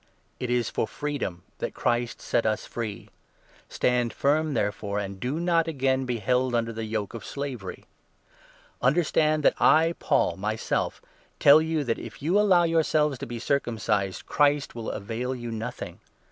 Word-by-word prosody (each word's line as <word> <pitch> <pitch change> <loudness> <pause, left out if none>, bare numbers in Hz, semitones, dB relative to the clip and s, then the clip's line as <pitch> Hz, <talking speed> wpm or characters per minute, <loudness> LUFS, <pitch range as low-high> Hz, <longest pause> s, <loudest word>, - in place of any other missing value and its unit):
Christian - - -36 0.2
It 125 - -3
is 120 -2 +1
for - - -1
freedom 140 - -4 0.2
that - - -4
Christ 120 0 -1
set 115 - +1
us 110 -1 0
free; 110 -4 -5 0.6
stand 120 -2 +1
i - - -24
Freedom, - - -26 0.3
firm - - -2
therefore, 100 -1 -1
and 100 -1 -4
do 130 +8 -2
not 170 -1 +2
again 135 -3 0
be 125 -1 -1
held 125 +3 +1
under 115 0 0
the 110 0 -4
yoke 110 -2 -3
of 115 - -7
slavery. 135 -9 -6 1.0
Understand 155 +2 +2
that - - +5
I, 165 +2 +5
Paul, - - +1
myself 105 +3 -2 0.4
tell 145 +2 +8
you 160 -1 0
that 115 -4 -1
if 115 -3 -9
you 175 +8 +2
allow 190 -4 +5
2 165 - 0
yourselves 150 -4 +2
to - - -5
be 120 0 -5
circumcised, 110 -7 -1
Christ 145 -1 +2
will 115 -1 -5
avail 120 +5 -3
you 120 -1 -6
nothing. 115 +2 -6
125 Hz, 175 wpm, -26 LUFS, 110-150 Hz, 1.0 s, tell